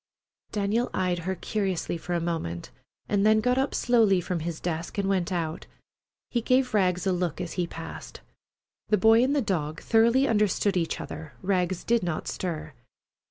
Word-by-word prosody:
Daniel 215 Hz, +3 st, 0 dB
eyed 180 Hz, -2 st, 0 dB
her 190 Hz, +3 st, -2 dB
curiously 190 Hz, -4 st, -2 dB
for 175 Hz, +1 st, -3 dB
a -, -, +1 dB
moment, 165 Hz, -, -3 dB, 0.4 s
and 200 Hz, -1 st, +1 dB
then 215 Hz, +1 st, +5 dB
got 250 Hz, +3 st, +2 dB
up 270 Hz, -, 0 dB
slowly 225 Hz, -6 st, +4 dB
from 180 Hz, 0 st, -2 dB
his 160 Hz, 0 st, -4 dB
desk 170 Hz, +1 st, -4 dB
and 200 Hz, -1 st, 0 dB
went 190 Hz, -2 st, 0 dB
out. 165 Hz, -2 st, -3 dB, 0.6 s
He 240 Hz, -, +1 dB
gave 255 Hz, +1 st, +2 dB
Rags 185 Hz, -3 st, +2 dB
a 190 Hz, -, +2 dB
look 180 Hz, -2 st, -2 dB
as 180 Hz, -2 st, -4 dB
he 180 Hz, -2 st, -1 dB
passed. 165 Hz, -1 st, -8 dB, 0.7 s
The 210 Hz, -, +3 dB
boy 225 Hz, +4 st, +6 dB
and 275 Hz, +3 st, +2 dB
the 280 Hz, -, +2 dB
dog 160 Hz, -6 st, -2 dB
thoroughly 235 Hz, +4 st, +3 dB
understood 210 Hz, -2 st, +2 dB
each 170 Hz, -2 st, -1 dB
other. 160 Hz, -, -7 dB
Rags 185 Hz, -2 st, 0 dB
did 235 Hz, 0 st, +2 dB
not 170 Hz, -3 st, -3 dB
stir. 160 Hz, -4 st, -4 dB
185 Hz, 175 wpm, -27 LUFS, 170-220 Hz, 0.7 s, boy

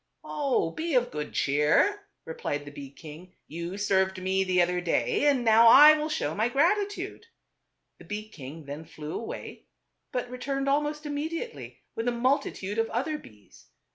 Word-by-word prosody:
" -, -, -52 dB
Oh! 275 Hz, -, 0 dB
be 320 Hz, -, -3 dB
of 245 Hz, -1 st, +2 dB
good 150 Hz, 0 st, -5 dB
cheer," 150 Hz, -, +2 dB, 0.2 s
replied 145 Hz, -2 st, -4 dB
the 145 Hz, -, -9 dB
bee 140 Hz, -1 st, -9 dB
king. 160 Hz, +5 st, -12 dB
"You 170 Hz, +4 st, -6 dB
served 190 Hz, -2 st, +1 dB
me 190 Hz, +1 st, +1 dB
the 185 Hz, -1 st, +1 dB
other 180 Hz, 0 st, +2 dB
day, 175 Hz, -, +1 dB
and 265 Hz, -4 st, +2 dB
now 225 Hz, +1 st, +6 dB
I 295 Hz, +6 st, +10 dB
will 305 Hz, 0 st, -2 dB
show 150 Hz, -, -2 dB
my 220 Hz, +6 st, 0 dB
gratitude." 405 Hz, -, 0 dB, 0.7 s
The -, -, -14 dB
bee 210 Hz, +1 st, -5 dB
king 150 Hz, -4 st, -10 dB
then 145 Hz, +3 st, -7 dB
flew 155 Hz, -1 st, -8 dB
away; 230 Hz, -, -7 dB, 0.4 s
but 250 Hz, -1 st, -2 dB
returned, 270 Hz, +2 st, -3 dB
almost 295 Hz, +2 st, 0 dB
immediately, 320 Hz, +10 st, -5 dB
with 225 Hz, +1 st, -4 dB
a -, -, +3 dB
multi 255 Hz, +4 st, +1 dB
tude 200 Hz, +3 st, -5 dB
of 225 Hz, -, +1 dB
other 300 Hz, +7 st, -2 dB
bees. 105 Hz, -, -18 dB
220 Hz, 170 wpm, -27 LUFS, -, 0.7 s, I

